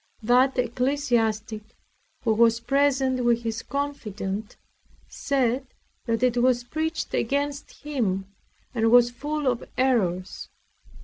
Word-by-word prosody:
That 250 +4 +3
ecclesiastic, 240 -4 0 0.6
who 225 -3 +2
was 230 +1 +4
present 265 0 +1
with 235 0 +2
his 225 -1 -3
confidant, 220 -7 -4 0.5
said 260 -1 -1 0.4
that 230 -1 -1
it 245 -1 +2
was 245 0 +3
preached 315 +5 -3
against 280 +5 -2
him, 220 -11 -1 0.5
and 225 -2 +2
was 240 0 +6
full 295 +4 -4
of 245 -2 0
errors. 195 -9 0
245 Hz, 110 wpm, -25 LUFS, 225-275 Hz, 0.6 s, was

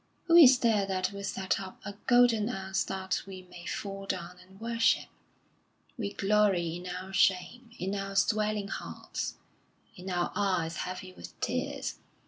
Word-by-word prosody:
Who 340 -1 +3
is 265 -7 +10
there 220 -5 +2
that 185 0 0
will 200 0 -7
set 190 -1 -1
up 190 -1 -8
a 200 - -5
golden 240 -3 +5
ass 190 -4 -1
that 190 0 -2
we 185 -1 -8
may 175 0 -10
fall 195 -1 -5
down 180 0 -4
and 190 +2 -17
worship? 230 0 +2 0.9
We 205 -5 -4
glory 195 -5 +2
in 180 +1 -8
our 185 +1 -6
shame, 195 +6 +1
in 190 +2 -2
our 195 0 -4
swelling 210 0 +1
hearts, - - -5 0.6
in 185 +1 -8
our 175 -1 0
eyes 180 -5 0
heavy 185 0 -5
with - - -12
tears. - - -2
195 Hz, 155 wpm, -30 LUFS, 185-210 Hz, 0.9 s, is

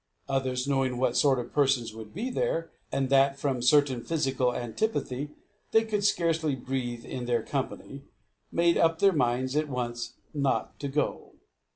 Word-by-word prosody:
Others, 130 -1 -1
knowing 135 -3 +1
what 125 -1 +1
sort 140 -2 +4
of 125 - -5
persons 135 -6 +2
would 110 -1 -9
be 235 +8 -3
there, 165 -8 -1 0.2
and 135 -1 0
that, 135 0 +4
from 135 -2 -1
a - - -5
certain 130 -1 +3
physical 135 -6 +1
antipathy, 130 - -2 0.4
they 225 - +6
could 210 -2 -1
scarcely 165 -6 +2
breathe 125 -2 -4
in 125 -1 -5
their 120 -2 +1
company, 140 0 -4 0.5
made 170 0 +3
up 165 0 +3
their 195 +2 +4
minds 130 -1 +1
at 150 0 +1
once 120 -2 -4 0.2
not 140 -2 -1
to 140 - -3
go. 150 +2 -2
135 Hz, 165 wpm, -28 LUFS, 125-150 Hz, 0.5 s, they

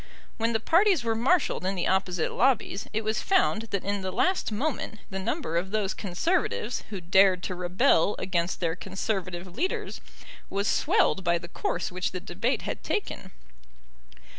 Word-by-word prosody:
When 230 +1 +1
the 225 - +2
parties 345 - +3
were 230 -1 +1
marshalled 260 - +2
in 190 +1 -1
the 175 - -1
opposite 185 -3 0
lobbies 245 -5 +1
it 220 +1 -1
was 215 0 0
found 370 - +2
that 200 -2 -2
in 200 0 -1
the 190 - -3
last 370 - +1
moment 245 0 -2
the 190 - -3
number 190 - -2
of 180 +3 -1
those 210 -1 0
Conservatives 235 - -1
who 200 -3 -5
dared 185 +1 +4
to 185 - -2
rebel 180 +2 +2
against 175 -1 -1
their 165 -2 0
Conservative 190 -1 -3
leaders 265 - -3 0.5
was 200 +1 -1
swelled 310 - +2
by 170 0 +2
the 170 - -8
course - - -2
which 180 0 -2
the 185 - -3
debate 230 +9 -2
had - - -4
taken. 395 - -3
195 Hz, 165 wpm, -27 LUFS, 185-235 Hz, 0.5 s, dared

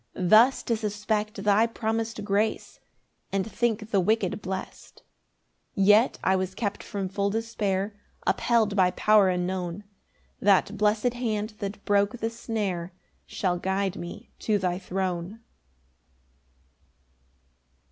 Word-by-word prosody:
Thus 215 +8 +5
to 230 - 0
suspect 210 -1 -2
thy 210 +2 +4
promis'd 225 -1 -3
grace, 210 +2 -1 0.5
And 195 -1 0
think 225 -2 -1
the 200 - +3
wicked 210 +1 +1
blest. 190 0 -7 0.7
10 195 - +2
Yet 210 +5 +5
I 190 - +3
was 185 0 -2
kept 205 -2 -3
from 195 -2 -4
full 200 +1 -1
despair, 205 -2 -1 0.3
Upheld 225 -4 +2
by 185 -2 +4
power 205 +1 +4
unknown; 180 +1 -2 0.6
That 200 +1 +3
blessed 215 +3 +1
hand 220 -3 -2
that 200 0 -6
broke 205 +3 +2
the 225 0 -2
snare 200 -7 -3 0.3
Shall 180 -2 -1
guide 190 +1 -1
me 175 0 -8
to 215 -2 +1
thy 180 -2 -1
throne. 185 +2 -3
205 Hz, 120 wpm, -26 LUFS, 190-220 Hz, 0.7 s, Thus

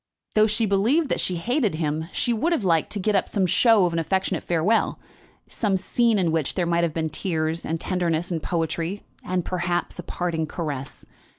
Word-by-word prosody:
Though 215 0 +5
she 220 +1 +1
believed 225 +11 +2
that - - 0
she 185 - +1
hated 225 - 0
him, 155 +1 -2
she 240 - +1
would 320 +10 +1
have 285 - -1
liked 165 -4 +2
to 210 - -2
get 210 +2 +1
up 195 - +1
some 195 -3 +1
show 215 +2 +4
of 175 - -1
an 165 - 0
affectionate 190 +1 -1
farewell, 175 +7 +1 0.5
some 205 -4 0
scene 230 +4 +2
in 175 -4 +2
which 160 -3 -1
there 180 - +1
might 170 0 +1
have 170 - +1
been 160 -1 -1
tears, 160 -2 -1
and 165 +1 -2
tenderness, 175 -1 -1
and 165 -2 -1
poetry, 170 +3 -2 0.2
and, 180 -1 -2
perhaps, 175 -1 -2
a - - -4
parting 165 -3 -2
caress. 145 -5 -5
180 Hz, 200 wpm, -24 LUFS, 165-205 Hz, 0.5 s, Though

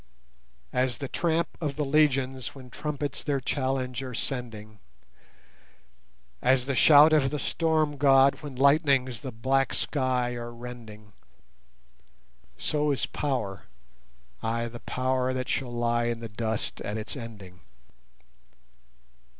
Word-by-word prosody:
As 125 0 +1
the 140 - -4
tramp 170 +3 0
of 145 -3 -2
the 150 - -1
legions 135 -3 +1
when 130 -2 -12
trumpets 150 -1 -4
their 140 -2 0
challenge 130 -1 -2
are 130 -2 -6
sending, 110 -5 -5 1.6
As 130 -1 +3
the 140 - -1
shout 150 +4 +7
of 140 -3 +4
the 150 - -3
Storm 155 -1 0
god 135 0 +5
when 145 -3 -7
lightnings 135 -3 +3
the 135 -3 -6
black 135 +4 0
sky 130 -3 0
are 120 0 -6
rending, 115 -3 -10 1.4
So 150 - 0
is 140 - +1
power! 125 -10 -3 0.8
ay, 115 +1 -1
the 120 0 -9
power 130 +1 -1
that 130 0 -3
shall 125 -3 -2
lie 120 0 0
in 120 -1 -1
the 115 - -6
dust 110 0 -3
at 105 +2 -4
its 110 +5 -6
ending. 100 -8 -9
130 Hz, 125 wpm, -27 LUFS, 120-140 Hz, 1.6 s, shout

